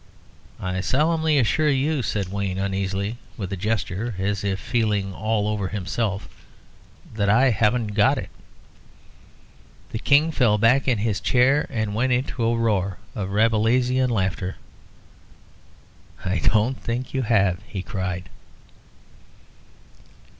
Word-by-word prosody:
"I 95 0 -2
solemnly 155 - +2
assure 150 +5 +2
you," 140 +1 +1
said 100 -5 -2
Wayne, 100 -2 -2
uneasily, 100 +2 -2 0.2
with 100 -3 -4
a - - 0
gesture, 105 +2 -2
as 100 +1 -1
if 100 -1 -1
feeling 105 -3 0
all 110 +1 -1
over 105 -2 -1
himself, 100 +1 -3 0.9
"that 100 -2 0
I 125 +5 +5
haven't 110 0 +1
got 105 0 +3
it." - - -6 1.6
The 110 - -3
King 150 +6 +4
fell 120 -8 +3
back 120 +6 +3
in 125 -3 +3
his 105 -3 -1
chair, 125 - +3
and 110 -5 -2
went 125 +4 +1
into 125 -1 -1
a 115 +1 +2
roar 100 -5 0 0.2
of 100 -2 -4
Rabelaisian 115 +5 +2
laughter. 95 -4 -1 1.7
"I 90 0 0
don't 115 +4 +1
think 120 +2 -4
you 135 - 0
have," 100 -6 +2
he 95 -3 -5
cried. 95 -3 -4
110 Hz, 125 wpm, -23 LUFS, 100-125 Hz, 1.7 s, I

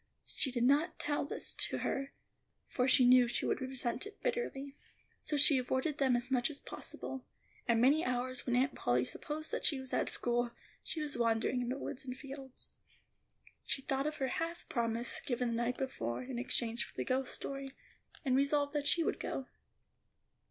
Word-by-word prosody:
She 270 - -1
did 240 -1 0
not 285 +7 +3
tell 290 -1 0
this - - -2
to - - +1
her, 275 0 -2 0.6
for 250 0 +1
she 260 -1 +6
knew 250 0 +7
she 240 - -1
would - - 0
resent 260 - -2
it 420 - -12
bitterly. 285 - -2 0.5
So 295 - -1
she 285 -1 +6
avoided 260 +4 -1
them 265 -3 +4
as 245 +2 -2
much 245 -2 +3
as 290 -2 -5
possible, 265 -1 -6 0.4
and 235 -1 +4
many 285 +7 +5
hours 255 +1 -1
when 245 - +2
Aunt 265 +2 +3
Polly 125 +1 +1
supposed 310 - -4
that - - -2
she 280 - +2
was 265 0 -7
at - - +2
school, 240 0 +1 0.3
she 320 - -1
was 295 -4 -1
wandering 230 +2 +2
in 240 - -2
the 260 - -1
woods 265 - -5
and 255 -1 -5
fields. 270 -1 -6 0.9
She 270 - -1
thought 270 +2 0
of 305 - -2
her 265 -3 -1
half 335 +5 -3
promise 235 -1 0
given 245 -1 0
the 230 - -1
night 245 +1 -1
before 120 - -2
in 250 -1 -4
exchange 240 -2 +1
for - - -12
the - - -1
ghost 260 0 0
story, 275 0 -4 0.6
and 260 -1 +3
resolved 285 +1 +2
that 290 -1 0
she 335 - +4
would - - -1
go. 270 - -3
265 Hz, 190 wpm, -34 LUFS, 245-280 Hz, 0.9 s, knew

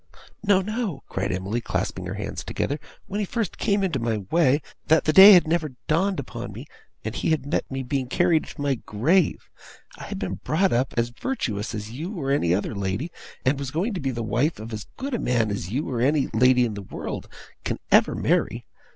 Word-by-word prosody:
'No! 200 -2 +4
no!' 215 - -3
cried 95 +1 -2
Emily, 95 +6 -2
clasping - - -3
her - - -4
hands - - -5
together. 145 +2 -2 0.3
'When 205 - -4
he 210 - 0
first 225 -4 -3
came 200 -2 +1
into 170 -8 0
my 115 -2 0
way 150 -3 +3 0.2
that 160 0 +5
the 155 - +3
day 195 +4 +11
had 175 -3 +6
never 155 -4 0
dawned 190 +4 +1
upon 140 - -6
me, - - -8 0.4
and - - -2
he - - -1
had 155 -4 +1
met 145 - -1
me 135 0 -3
being 130 0 -2
carried 170 +3 +2
to - - -12
my 140 -1 +2
grave! 145 - +1 0.5
I - - -7
had - - -5
been - - -4
brought 185 +6 +2
up 125 +3 0
as 120 0 +2
virtuous 120 - -3
as 105 +1 -6
you 170 - -5
or 135 -2 -1
any 90 -11 +2
lady, 100 - -2 0.3
and 135 +2 +2
was 140 -2 -3
going 175 - -1
to 185 - -3
be 135 - -1
the 120 -2 -3
wife 125 +8 0
of 110 +1 -7
as 105 -1 -6
good 275 +1 -4
a 240 - 0
man 115 -4 +1
as 100 -3 -4
you 135 +9 -2
or 120 -3 -2
any 140 +2 +2
lady 125 +2 +5
in 115 - -3
the 100 - -6
world 95 - -6 0.4
can - - -2
ever - - +5
marry. - - 0
140 Hz, 215 wpm, -25 LUFS, 115-175 Hz, 0.5 s, day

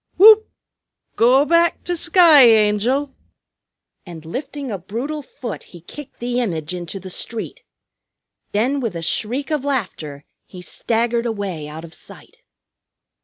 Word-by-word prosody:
Whoop! 435 +2 +7 0.7
Go 255 +5 +4
back 335 +2 +2
to 355 - -2
sky, 340 -3 +6
Angel!" 230 +5 +2 0.9
and 165 -3 -11
lifting 270 - -6
a 200 - -4
brutal 245 - -5
foot 255 -5 -8 0.2
he - - -16
kicked 285 - -11
the 245 +1 -2
image 165 -7 -3
into 180 +2 -6
the 185 0 -9
street. 225 +4 -4 0.9
Then 250 +7 0
with 230 -8 -3
a 165 - -5
shriek 250 - -2
of 300 -3 -1
laughter 185 - -4 0.2
he 185 - -11
staggered 235 +4 -1
away 195 -9 -4
out 155 +2 -8
of 165 - -14
sight. - - -13
235 Hz, 135 wpm, -20 LUFS, 185-285 Hz, 0.9 s, Whoop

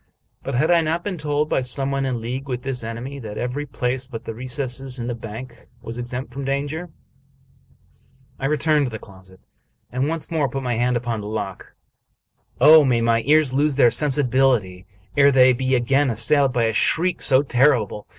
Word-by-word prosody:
But 135 - -4
had 155 +7 +2
I 170 -1 +5
not 165 +2 -2
been 195 -2 -4
told, 150 0 -1
by 135 - 0
some 135 +2 -2
one 135 -1 -1
in 125 -3 -2
league 130 +4 -5
with 125 -1 -4
this 130 -3 -4
enemy, 120 +5 -6
that 105 -4 -8
every 130 +4 -3
place 125 +1 -2
but 115 -4 -8
the 115 - -5
recess 130 +1 -4
in 120 - -5
the 120 - -3
bank 115 +2 -9
was 115 +2 -8
exempt 125 0 -6
from 140 +1 -5
danger? 145 +5 -3 1.5
I 135 - -1
returned, 150 -1 +1
to - - -4
the 110 - -6
closet, 95 -2 -17 0.5
and 130 +3 -1
once 165 +1 -3
more 150 -4 0
put 135 +2 -5
my 125 -1 -1
hand 120 +1 +1
upon 120 -2 -3
the 105 - -7
lock. 105 -3 -6 0.8
Oh, 155 +3 +8
may 125 -4 +1
my 115 0 +2
ears 150 -3 +4
lose 145 +1 +1
their 125 -4 +5
sensibility 130 -10 +1 0.3
ere 140 -1 +5
they 130 -1 +5
be 130 +1 0
again 135 +3 +2
assailed 130 +5 +2
by 120 -2 0
a 110 0 +1
shriek 175 - +1
so 135 -1 +4
terrible 125 -6 +1
130 Hz, 190 wpm, -21 LUFS, 120-140 Hz, 1.5 s, Oh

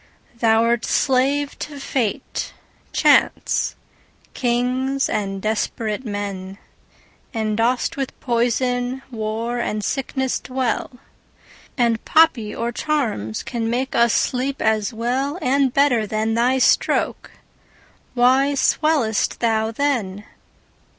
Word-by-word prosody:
Thou'rt 230 +1 +3
slave 275 +2 +1
to 290 -1 -6
fate, 250 -6 -3 0.4
chance, - - +2 0.6
kings, 255 +2 0
and 195 -2 -2
desperate 215 +2 -2
men, 200 -3 -5 0.8
And 215 -1 -1
dost 240 +5 0
with 270 -2 -4
poison, 245 +1 0
war, 225 +1 -3
and 215 -3 -2
sickness 265 0 -1
dwell; 255 -3 -2
10 250 - -20 0.8
And 235 -3 +1
poppy 265 -10 +3
or 235 +1 -2
charms 230 - -2
can 230 -2 -3
make 255 +3 -1
us 235 -1 +4
sleep 265 +2 0
as 220 0 +1
well 255 +7 -1
And 275 -3 +2
better 250 -6 +2
than 220 +1 -1
thy 245 +3 +2
stroke. 260 - +1 0.8
Why 260 +3 +4
swell'st 275 -5 +1
thou 220 -1 +1
then? 225 -7 -1
240 Hz, 105 wpm, -21 LUFS, 220-265 Hz, 0.8 s, us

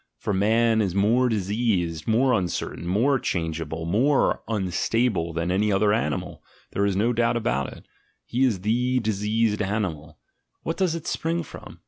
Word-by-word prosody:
For 105 - -2
man 110 +3 +3
is 95 -3 -1
more 115 +6 +3
diseased, 95 -6 -1
more 125 +4 +3
uncertain, 90 -4 -2
more 120 +9 +2
changeable, 80 -3 -3
more 125 - +2
unstable 95 -1 0
than 85 +2 -2
any 105 +3 +1
other 105 +1 +3
animal, 75 -10 -2 0.3
there 100 +1 +1
is 100 - 0
no 115 +5 +2
doubt 115 0 +1
of 115 - -5 0.2
it - - -12 0.2
— - - -45
he 125 +3 0
is 110 -8 +1
the 125 +5 +1
diseased 110 0 0
animal: 90 -7 -3 0.5
what 165 - -3
does 185 -4 +1
it 165 - -6
spring 165 +1 -1
from? - - -12
105 Hz, 160 wpm, -25 LUFS, 90-120 Hz, 0.5 s, man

